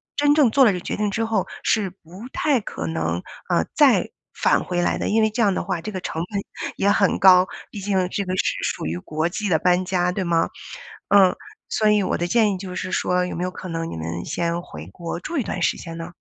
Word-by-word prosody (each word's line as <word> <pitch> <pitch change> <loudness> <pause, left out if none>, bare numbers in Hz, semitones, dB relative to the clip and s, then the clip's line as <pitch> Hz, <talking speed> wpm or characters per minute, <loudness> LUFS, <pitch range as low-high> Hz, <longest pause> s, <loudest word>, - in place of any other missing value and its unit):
真 290 0 +4
正 280 -7 +4
做 275 +4 +5
了 215 - +5
这 180 - -3
决 - - -4
定 210 -1 -1
之 225 +3 -1
后 220 -4 0 0.2
是 210 -3 +1
不 185 +4 -12
太 275 -7 +1
可 80 - -5
能， 80 +2 -2 0.3
啊， - - +2
再 - - +4 0.2
返 - - +2
回 175 -1 -1
来 - - +1
的。 - - -2
因 220 +1 +3
为 220 - +3
这 220 +2 -2
样 200 -3 +4
的 - - -2
话， 185 -4 -2
这 215 - -5
个 185 - -4
成 165 -1 -3
本 200 - -1 0.4
也 200 - +2
很 200 - +2
高， 185 -1 +7 0.3
毕 205 - -7
竟 190 -2 +1
这 200 - -2
个 185 0 -3
是 - - +1
属 - - -2
于 80 +2 -2
国 155 - -2
际 200 +3 -3
的 160 -3 +3
搬 180 +1 +3
家， 180 -1 0
对 190 0 -2
吗？ 170 -1 +2 0.6
嗯， 195 -2 +6 0.3
所 215 -1 +2
以 210 -2 +3
我 - - 0
的 175 - -1
建 215 +1 +3
议 - - -3
就 185 -1 -7
是 185 - -4
说 180 0 +1
有 180 - -5
没 175 - -3
有 185 - -2
可 185 - -8
能 165 -1 -3
你 - - -6
们 85 +2 -4
先 170 0 -1
回 75 - -10
国 170 - -6
住 325 - -4
一 255 - +1
段 185 - -4
时 - - +2
间 165 0 -8
呢？ 165 0 -6
185 Hz, 270 characters per minute, -22 LUFS, 170-205 Hz, 0.6 s, 高